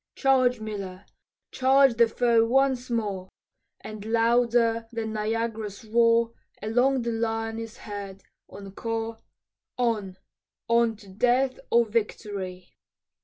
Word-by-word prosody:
"Charge, 255 -3 +3
Miller, 200 -3 -6 0.5
charge 265 0 +4
the 230 0 +4
foe 230 0 +3
once 255 +1 +1
more," 205 -5 -2 0.5
And 215 -1 -8
louder 230 0 +2
than 225 -2 -4
Niagara's 220 -1 -3
roar 230 +1 +3 0.3
Along 245 +4 +1
the 235 - -1
line 225 0 -2
is 225 0 -8
heard, 200 -2 -8 0.3
encore, 225 +3 -5 0.6
"On, 215 -6 -1 0.5
on 235 -1 +3
to 205 -1 -16
death 250 +7 +1
or 235 0 +4
victory." 205 -4 -4
225 Hz, 110 wpm, -26 LUFS, 215-235 Hz, 0.6 s, charge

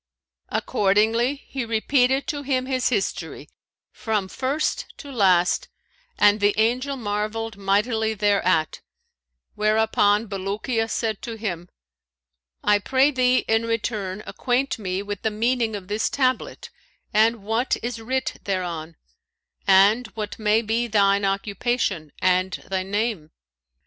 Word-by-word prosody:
Accordingly, 220 +6 +2
he 265 -2 -3
repeated 250 +4 +1
to 290 -2 -3
him 260 -2 -1
his 260 -1 0
history, 205 -6 -3 0.4
from 215 -4 -2
first 275 +8 -1
to 285 - -10
last, 185 -7 +3 0.5
and 205 +1 +5
the 205 0 +2
Angel 250 +5 +1
marvelled 215 0 -3
mightily 220 +3 0
thereat, 195 -6 +1 0.7
whereupon 215 0 +2
Bulukiya 210 +4 -2
said 220 -3 -2
to 230 - -6
him, 180 -6 -5 0.9
'I 210 0 +4
pray 265 +6 +3
thee 255 -1 +2
in 225 +1 +1
return 210 -3 -2
acquaint 255 0 -1
me 190 -1 -3
with 205 -1 -5
the 220 - +1
meaning 225 +1 0
of 190 -3 -7
this 210 +2 0
tablet 260 -2 -1 0.4
and 220 0 +3
what 225 +5 0
is 240 -1 -4
writ 260 +3 -2
thereon; 170 -4 -3 0.7
and 200 +5 +5
what 210 -1 -5
may 215 +1 +2
be 230 +2 0
thine 200 -2 +3
occupation 195 - -1
and 185 0 +2 0.2
thy 190 -1 0
name.' 200 -4 -2
220 Hz, 125 wpm, -23 LUFS, 200-240 Hz, 0.9 s, and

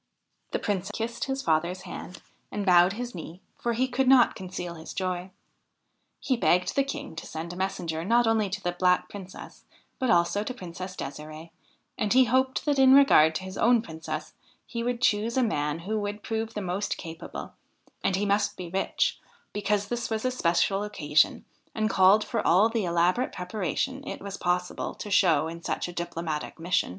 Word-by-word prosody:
The - - -1
Prince 195 -3 -2
kissed 230 +1 -3
his 270 0 -3
father's 170 +2 0
hand 180 - -9 0.3
and 205 -1 -3
bowed 180 0 +6
his 240 +3 -5
knee, 170 0 -8 0.2
for 235 - 0
he 255 +3 +1
could 260 +1 0
not 255 -2 +6
conceal 180 -2 -6
his 160 -1 -9
joy. 185 -1 -2 0.9
He 260 - 0
begged 180 -6 +2
the 275 - +4
King 275 - -6
to 165 - -6
send 165 +2 -6
a - - -8
messenger 170 -4 -2
not 235 +5 +3
only 220 -3 +2
to 195 +1 -5
the 175 - 0
Black 180 0 +2
Princess 190 -2 -10 0.4
but 255 - 0
also 175 +3 +3
to 255 +3 -5
Princess 185 -1 -7
Desiree; 155 +3 -8 0.5
and 210 0 +1
he 260 +1 +7
hoped 260 +2 +1
that 290 -2 +2
in 265 0 +8
regard 160 - +6
to 185 - -3
his 190 +1 -7
own 235 -1 +4
Princess, 160 -3 -6 0.3
he 235 - -4
would 245 +1 -2
choose 220 +3 +2
a 260 - +4
man 150 -9 0
who 215 +5 -2
would 205 0 -4
prove 225 0 -3
the 210 - -3
most 190 +3 -2
capable; 165 -2 -8 0.5
and 190 - +2
he 200 +2 0
must 205 0 +1
be 175 -2 -7
rich, 195 +1 0 0.3
because 205 0 0
this 240 +2 -3
was 220 +1 -2
a 255 - +2
special 195 -2 +1
occasion 155 -8 +1 0.3
and 215 0 0
called 195 +3 +5
for - - -2
all 195 +6 +4
the 225 -3 -1
elaborate 175 +8 +2
preparation 205 - -3
it - - -5
was 200 0 -6
possible 180 0 -2
to 205 - -7
show 165 -6 +4
in 170 +1 -7
such - - -2
a 175 - -8
diplomatic 165 -3 -4
mission. 175 +2 +1
195 Hz, 190 wpm, -27 LUFS, 175-225 Hz, 0.9 s, in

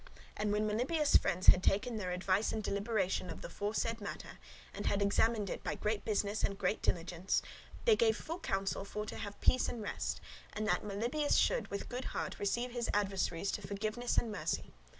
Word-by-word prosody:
And 210 0 0
when 210 +1 +1
Melibœus' 275 +8 +3
friends 185 - -1
had 180 - +8
taken 225 +6 +1
their 185 -4 -3
advice 185 +3 +1
and 215 - -2
deliberation 200 -3 0
of - - -7
the - - -5
foresaid 220 +3 -1
matter, 200 - -7 0.3
and - - -4
had 200 - +2
examined 210 +1 +2
it - - -4
by - - -2
great 210 0 -1
business 210 -1 0
and 195 - 0
great 195 +3 0
diligence, 175 +2 0 0.4
they 455 -3 +7
gave 220 - +3
full 330 +3 -5
counsel 195 - -1
for 210 +1 -4
to - - -6
have 205 -2 -6
peace 255 - +4
and 230 -3 -5
rest, - - -2 0.3
and 215 0 -2
that - - +2
Melibœus 235 +9 0
should - - +2
with 200 - -4
good 250 +1 -4
heart - - -3
receive 240 +5 0
his 240 -1 -2
adversaries 195 -2 0
to - - -3
forgiveness 215 +5 -2
and 230 - +2
mercy. 205 - -2
210 Hz, 190 wpm, -34 LUFS, 195-230 Hz, 0.4 s, had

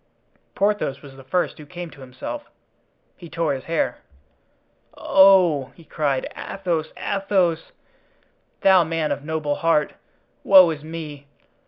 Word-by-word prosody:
Porthos 200 -10 0
was 135 -2 -12
the 135 - -13
first 170 +5 -2
who 150 - -10
came 175 0 -8
to 145 - -15
himself. 130 - -8 0.7
He 170 -3 -12
tore 165 -3 -1
his 130 - -6
hair. 160 -7 -1 1.0
"Oh!" 185 -7 +5
he 170 - -16
cried, 145 -3 -2
"Athos! 170 -5 -3
Athos! 190 -5 0 0.9
thou 190 -2 +6
man 160 -1 -2
of - - -3
noble 155 -1 -2
heart; 165 -3 +1 0.5
woe 185 -3 +7
is 150 -2 -7
me! 155 -3 -8
160 Hz, 130 wpm, -22 LUFS, 145-180 Hz, 1.0 s, woe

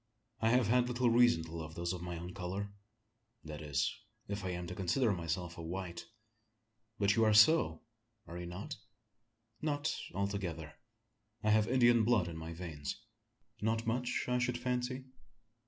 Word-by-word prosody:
I 110 - +3
have 125 0 +4
had 125 +3 +3
little 125 -1 +2
reason 120 -8 +5
to 80 +1 -8
love 80 -1 -6
those 85 +1 -2
of 90 - -5
my 90 -1 -4
own 90 +2 -7
colour 95 +3 -4 0.7
that 75 0 -7
is, 70 -3 0 0.3
if 100 0 -4
I 95 - -2
am 90 -1 -3
to 90 - -5
consider 100 +7 +1
myself 85 0 -3
a - - -4
white." 85 0 -5 0.9
"But 100 0 +3
you 115 - +4
are 110 -1 +4
so, 110 - +6 0.4
are 85 - -9
you 90 - -5
not?" 90 +3 -6 0.8
"Not 150 0 0 0.2
altogether. 95 -6 -3 0.7
I 105 - +3
have 110 0 +4
Indian 120 -2 +5
blood 110 -6 +3
in 85 - -6
my 80 0 -6
veins." 80 -4 -5 0.6
"Not 110 +2 0
much, 125 +2 0
I 125 0 +2
should 125 -1 0
fancy?" 125 +1 -2
100 Hz, 165 wpm, -34 LUFS, 85-120 Hz, 0.9 s, so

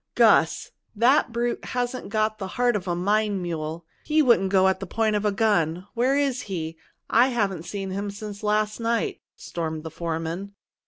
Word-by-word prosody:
"Gus! - - +4 0.2
That 245 +4 +4
brute 235 +1 -1
hasn't 245 -1 -3
got 215 +1 0
the 190 - -4
heart 245 -1 +3
of 190 -2 -3
a 175 - 0
mine 205 +2 +1
mule! 165 -1 -4 0.2
He 310 0 +3
wouldn't 235 -7 +4
go 190 -1 +4
at 190 - +1
the 195 - -6
point 220 +2 +1
of 210 0 -1
a 210 - +3
gun! 185 -5 +1
Where 255 +4 +2
is 275 -3 0
he? 165 -3 -4 0.3
I 240 +3 +5
haven't 200 -9 -1
seen 195 -2 -4
him 200 +2 -3
since 205 0 -7
last 210 +1 0
night," 230 0 -1
stormed 160 -2 -5
the 160 - -6
foreman. 165 +4 -4
205 Hz, 180 wpm, -25 LUFS, 180-230 Hz, 0.3 s, I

